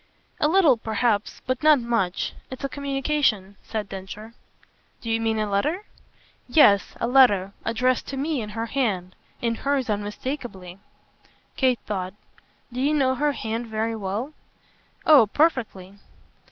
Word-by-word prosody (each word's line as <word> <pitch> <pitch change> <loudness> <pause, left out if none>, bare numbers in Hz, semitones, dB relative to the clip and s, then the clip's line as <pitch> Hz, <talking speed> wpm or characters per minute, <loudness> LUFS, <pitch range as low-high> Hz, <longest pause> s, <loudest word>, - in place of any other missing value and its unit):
"A - - +3
little 320 -7 +5
perhaps 220 -1 -1
but 255 0 -2
not 305 -2 +6
much. 230 -6 -1 0.2
It's 260 +1 -8
a 275 - -1
communication," 270 -8 -1
said 215 -2 -4
Densher. 195 +4 -8 0.7
"Do 230 - -4
you 225 0 +1
mean 225 -1 0
a 215 -1 0
letter?" 295 - 0 0.6
"Yes, 210 -8 +4
a - - 0
letter. 235 -7 +4
Addressed 250 +2 0
to 275 - -5
me 290 -1 -1
in 210 - -6
her 225 - -1
hand 210 -8 -1 0.3
in 230 -1 +1
hers 270 -1 -1
unmistakeably." 205 -3 -5 0.8
Kate 255 -2 +2
thought. 190 -2 -4 0.6
"Do 250 - -3
you 295 +3 +2
know 265 -3 +2
her 290 +2 0
hand 225 -1 -4
very 220 +1 -2
well?" 215 +8 -4 0.7
"Oh 280 -8 +7
perfectly." 210 - 0
230 Hz, 140 wpm, -24 LUFS, 205-270 Hz, 0.8 s, Oh